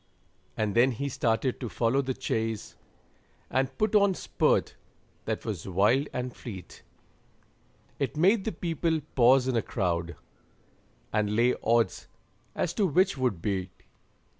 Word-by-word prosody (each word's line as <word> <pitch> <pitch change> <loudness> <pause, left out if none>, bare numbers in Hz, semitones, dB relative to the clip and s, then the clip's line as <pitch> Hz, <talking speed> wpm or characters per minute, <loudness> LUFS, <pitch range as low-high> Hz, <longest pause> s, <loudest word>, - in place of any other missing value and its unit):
And 105 -2 0
then 120 +4 +4
he 140 +5 -3
started 120 +1 0
to 120 - -4
follow 120 +5 +1
the 130 -1 -3
chase, 110 -1 -3 0.8
And 130 0 0
put 215 +1 +1
on 200 -2 +5
a - - -9
spurt - - +1 0.5
that - - -3
was 100 -7 -4
wild 105 +10 +2
and 125 0 -4
fleet, 95 -7 -9 1.2
It 140 +1 -2
made 195 +6 +4
the 220 - 0
people 165 -1 -1
pause 130 +1 +5
in 130 - 0
a 115 - +2
crowd, 85 -7 -2 1.0
And 105 -1 +1
lay 120 +2 +4
odds 115 0 +1 0.5
as 170 - -1
to 200 -1 +2
which 185 +5 +2
would 125 - -1
beat. 95 -3 -3
125 Hz, 140 wpm, -28 LUFS, 110-145 Hz, 1.2 s, on